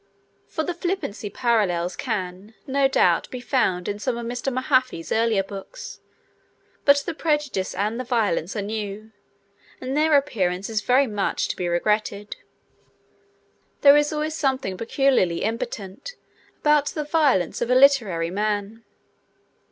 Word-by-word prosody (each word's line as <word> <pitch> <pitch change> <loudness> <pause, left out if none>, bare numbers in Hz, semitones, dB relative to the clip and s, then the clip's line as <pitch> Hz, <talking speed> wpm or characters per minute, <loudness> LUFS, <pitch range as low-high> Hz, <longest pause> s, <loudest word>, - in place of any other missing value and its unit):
For 315 - -3
the 355 - -2
flippancy 345 - -3
parallels 190 -7 0
can, 200 -3 -4
no 275 0 +2
doubt, 180 -10 +2
be 255 - -6
found 215 -9 0
in 205 0 -3
some 235 +3 -2
of 235 - -5
Mr. 245 +3 -3
Mahaffy's 255 - 0
earlier 225 -3 +2
books, 200 - -9 0.9
but 280 0 +7
the 340 - -3
prejudice 295 - -1
and 215 +4 -1
the - - -2
violence 210 -8 0
are 205 - -2
new, 215 0 -5 0.7
and 260 +1 -4
their 305 0 +4
appearance 195 -8 -1
is 215 -1 0
very 255 +5 +3
much 210 -5 -1
to - - -2
be 180 - -3
regretted. 205 +3 -1 1.5
There 280 0 +8
is 295 +1 +3
always 305 0 -2
something 265 -10 -1
peculiarly 230 -5 +1
impotent 225 - -5 0.5
about 295 -1 +3
the 305 - -3
violence 290 - +1
of 240 - -1
a 250 - +4
literary 225 -12 +4
man. 210 +2 -2
230 Hz, 140 wpm, -23 LUFS, 195-275 Hz, 1.5 s, There